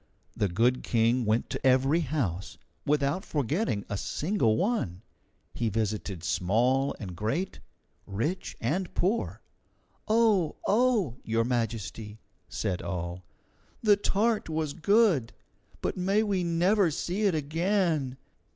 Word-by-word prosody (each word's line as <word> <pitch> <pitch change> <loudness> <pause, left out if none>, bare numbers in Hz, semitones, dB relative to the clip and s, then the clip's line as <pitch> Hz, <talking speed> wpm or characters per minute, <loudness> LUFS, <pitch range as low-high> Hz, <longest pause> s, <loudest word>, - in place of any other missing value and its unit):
The 105 - +1
good 115 +8 +2
King 115 +1 +2
went 110 +2 +1
to - - -4
every 135 +5 +4
house, 125 - -2 0.3
without 150 +5 +1
forgetting 145 - -1
a 100 - -3
single 150 - 0
one. 180 - -1 0.5
He 115 -2 -1
visited 105 -4 -2
small 120 +10 +1
and 95 -5 -6
great, 115 - -2 0.5
rich 115 - -3
and 170 +10 -1
poor. 205 +6 -1 0.6
"Oh, 215 -7 +3
oh! 215 - +2
Your 115 0 +1
Majesty," 115 -3 -3 0.3
said 95 -5 -2
all, 90 0 -4 0.6
"the 210 -2 +6
tart 210 0 0
was 155 -2 -2
good, 180 - +3 0.5
but - - -2
may 195 +4 +2
we 195 -4 0
never 175 +3 +3
see 180 +7 -2
it 185 - +1
again! 160 -3 0
140 Hz, 120 wpm, -28 LUFS, -, 0.6 s, the